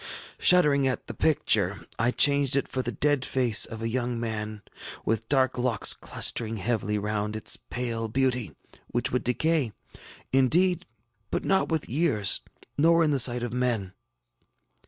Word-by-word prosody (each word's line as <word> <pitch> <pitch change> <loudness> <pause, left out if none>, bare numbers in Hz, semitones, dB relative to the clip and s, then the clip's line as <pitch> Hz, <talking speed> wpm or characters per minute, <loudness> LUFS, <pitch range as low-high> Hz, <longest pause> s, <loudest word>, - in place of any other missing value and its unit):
Shuddering 150 -7 +4
at 130 - -3
the - - -7
picture, 155 -2 +1
I 120 +2 +2
changed 140 +1 +3
it 140 - 0
for 130 - -3
the - - -4
dead 145 -3 0
face 125 -5 +2
of 115 -1 -8
a - - -1
young 120 0 -2
mail, 110 -2 -5 0.4
with 115 0 -2
dark 130 -3 +1
locks 120 -5 +2
clustering 115 -1 0
heavily 105 0 -2
round 105 +1 -3
its 110 - -5
pale 115 -2 -2
beauty, 125 0 -1 0.3
which 120 - -2
would 125 - -1
decay, 140 -1 0 0.6
indeed, 175 +7 +2 0.4
but - - -3
not 190 0 +1
with 160 -3 -1
years, 115 - +1 0.4
nor 165 +2 +4
in 155 - +1
the 140 - +1
sight 120 0 +4
of 120 -1 -4
men. 120 -7 -1
125 Hz, 155 wpm, -26 LUFS, 115-140 Hz, 0.6 s, Shuddering